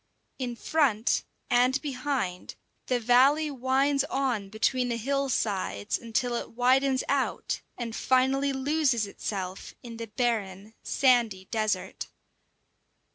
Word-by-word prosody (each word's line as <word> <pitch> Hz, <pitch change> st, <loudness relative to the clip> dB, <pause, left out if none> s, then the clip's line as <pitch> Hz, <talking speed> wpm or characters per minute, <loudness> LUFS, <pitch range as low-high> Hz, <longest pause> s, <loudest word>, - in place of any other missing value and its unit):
In 245 Hz, -2 st, -3 dB
front 245 Hz, -6 st, +1 dB, 0.2 s
and 250 Hz, +2 st, +3 dB
behind, 255 Hz, -, -3 dB, 0.3 s
the 250 Hz, -1 st, +1 dB
valley 270 Hz, +6 st, +4 dB
winds 270 Hz, +2 st, +1 dB
on 250 Hz, -9 st, -1 dB
between 245 Hz, +4 st, 0 dB
the 235 Hz, -, -1 dB
hill 275 Hz, +4 st, -1 dB
sides 190 Hz, -, -1 dB
until 240 Hz, +2 st, -1 dB
it 235 Hz, -, -4 dB
widens 260 Hz, +2 st, +3 dB
out 280 Hz, -1 st, -1 dB, 0.2 s
and 230 Hz, -2 st, -4 dB
finally 265 Hz, +2 st, +2 dB
loses 270 Hz, -4 st, +1 dB
itself 190 Hz, -2 st, -5 dB
in 230 Hz, -2 st, -8 dB
the 230 Hz, 0 st, -6 dB
barren, 215 Hz, -3 st, -2 dB
sandy 235 Hz, -8 st, +2 dB
desert. 215 Hz, -2 st, -2 dB
245 Hz, 115 wpm, -28 LUFS, 220-270 Hz, 0.3 s, valley